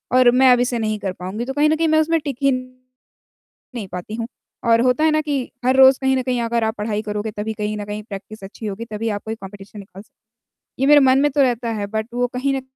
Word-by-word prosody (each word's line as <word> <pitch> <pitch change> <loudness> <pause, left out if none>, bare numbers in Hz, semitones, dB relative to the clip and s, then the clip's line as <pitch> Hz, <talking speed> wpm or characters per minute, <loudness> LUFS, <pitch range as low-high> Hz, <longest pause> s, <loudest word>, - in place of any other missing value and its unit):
और 250 -1 +6
मैं 255 0 +5
अब 245 - +2
इसे 245 -1 0
नहीं 215 -1 -2
कर 195 -2 -3
पाऊँगी 190 +6 -5
तो 270 - -4
कहीं 295 +2 +3
न 310 - +3
कहीं 330 0 +1
मैं 315 0 +3
उसमें 330 +1 +1
टिक 275 -4 -3
ही 275 - +4
नहीं 255 0 -8 0.8
पाती 180 +4 -6
हूँ। 230 0 -3 0.4
और 230 - +5
होता 255 +5 +2
है 315 - +4
ना 310 0 +2
कि 290 -2 -1 0.3
हर 260 +1 +3
रोज़ 265 0 +7
कहीं 265 0 +2
न 260 - 0
कहीं 250 -1 -1
अगर 230 0 0
आप 220 0 -1
पढ़ाई 210 0 -2
करोगे, 210 0 -4
तभी 210 +1 -4
कहीं 210 0 -3
न 205 - -4
कहीं 210 +1 -5
प्रैक्टिस 205 0 -9
अच्छी 210 +3 -8
होगी, 210 +3 -5
तभी 220 0 -4
आप 205 -2 -3
कोई 220 0 -4
कम्पटीशन 200 0 -11
निकाल 195 -1 -11
सकोगे। 220 +1 -35 0.5
ये 270 - +3
मेरे 295 0 +8
मन 260 0 +5
में 290 - +3
तो 285 - +2
रहता 245 -3 +1
है 205 - -2
बट 220 +1 -3
वो 245 0 +1
कहीं 275 +2 0
न - - -4
235 Hz, 265 wpm, -20 LUFS, 210-265 Hz, 0.8 s, मेरे